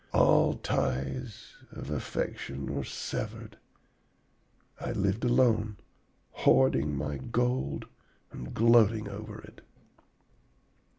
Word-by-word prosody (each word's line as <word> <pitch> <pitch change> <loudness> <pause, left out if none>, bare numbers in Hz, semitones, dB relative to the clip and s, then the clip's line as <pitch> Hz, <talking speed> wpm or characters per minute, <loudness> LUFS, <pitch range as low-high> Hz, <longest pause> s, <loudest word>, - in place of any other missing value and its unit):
All - - +5
ties 100 - -3 0.2
of 75 - -7
affection 70 -2 -3
were 70 -1 -2
severed. - - -5 1.2
I - - -3
lived 100 +3 0
alone, 115 -4 +3 0.5
hoarding 70 +2 +3
my 75 0 -3
gold 120 - -1 0.5
and 60 - -8
gloating 115 -2 +4
over 105 +2 -7
it. - - -15
100 Hz, 85 wpm, -29 LUFS, 70-115 Hz, 1.2 s, All